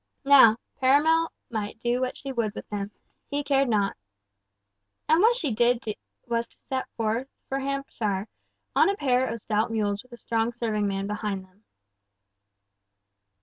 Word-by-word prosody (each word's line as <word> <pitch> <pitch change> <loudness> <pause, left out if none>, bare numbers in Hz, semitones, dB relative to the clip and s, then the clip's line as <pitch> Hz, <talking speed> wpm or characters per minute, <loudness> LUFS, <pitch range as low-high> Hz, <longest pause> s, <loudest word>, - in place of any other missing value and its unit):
Now, 265 -6 +8 0.2
Perronel 315 +5 +4 0.2
might 215 -1 -4
do 240 +1 0
what 255 0 -2
she 275 - -5
would 225 -4 -1
with - - -7
him—he 210 +7 -6
cared 275 -2 +2
not. 205 -3 +1 1.1
And 320 +3 +5
what 460 +3 +5
she 305 - -1
did 240 +1 +2 0.4
was 235 -1 -1
to - - -13
set 260 -1 -4
forth 230 +3 -1 0.2
with 270 0 0
him 275 0 -2
for - - -28
Hampshire, 195 +1 -1 0.5
on - - +5
a 400 - +1
pair 260 -4 +2
of 230 - -3
stout 215 +2 0
mules 205 -2 -1
with 255 - -25
a - - -9
strong 230 0 -1
serving 220 -3 -1
man 195 0 -2
behind 205 -2 -3
them. 195 +3 -29
235 Hz, 160 wpm, -26 LUFS, 210-270 Hz, 1.1 s, Now